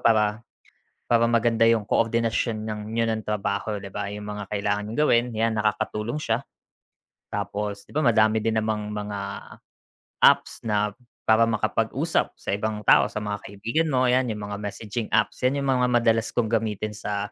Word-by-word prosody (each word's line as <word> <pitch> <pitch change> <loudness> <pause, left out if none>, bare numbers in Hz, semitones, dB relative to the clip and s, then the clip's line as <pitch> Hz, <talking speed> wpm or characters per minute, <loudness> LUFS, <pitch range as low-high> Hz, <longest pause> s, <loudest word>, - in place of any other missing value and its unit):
para 110 -2 +4 0.8
para 115 0 +3
maganda 115 -1 +3
yung 115 -2 +3
koordinasyon 115 0 0
ng 110 -1 -4 0.2
niyo 115 - +3
ng 110 -1 -1
trabaho 105 0 -2
'di 100 -1 -8
ba, 105 -1 -3
yung 105 +1 -6
mga 105 -2 -6
kailangan 105 0 -1
niyong 110 - -5
gawin, 125 -5 +3
'yan 115 +1 +1
nakakatulong 105 +3 -1
siya. 120 -6 0 0.9
Tapos 105 0 -4
'di - - -17
ba 155 - +2
madami 110 -2 +3
din 110 -1 +1
namang 105 -1 -2
mga 105 -1 -4 1.0
apps - - +4
na 105 -2 0 0.3
para 115 +1 +4
makapag-usap 110 -2 0
sa - - -5
ibang 105 +1 -2
tao - - +6
sa 105 - -5
mga 105 0 -3
kaibigan 115 +11 -1
mo, 130 -4 +2
'yan 125 +1 +3
yung 105 -2 -4
mga 100 - -4
messaging 105 +2 -4
apps, 105 0 +1
'yan 135 +2 +1
yung 135 - -1
mga 125 -1 +2
madalas 115 -2 +2
kong 115 -2 +1
gamitin 110 -2 -1
sa 105 0 -4
110 Hz, 170 wpm, -25 LUFS, 105-115 Hz, 1.0 s, tao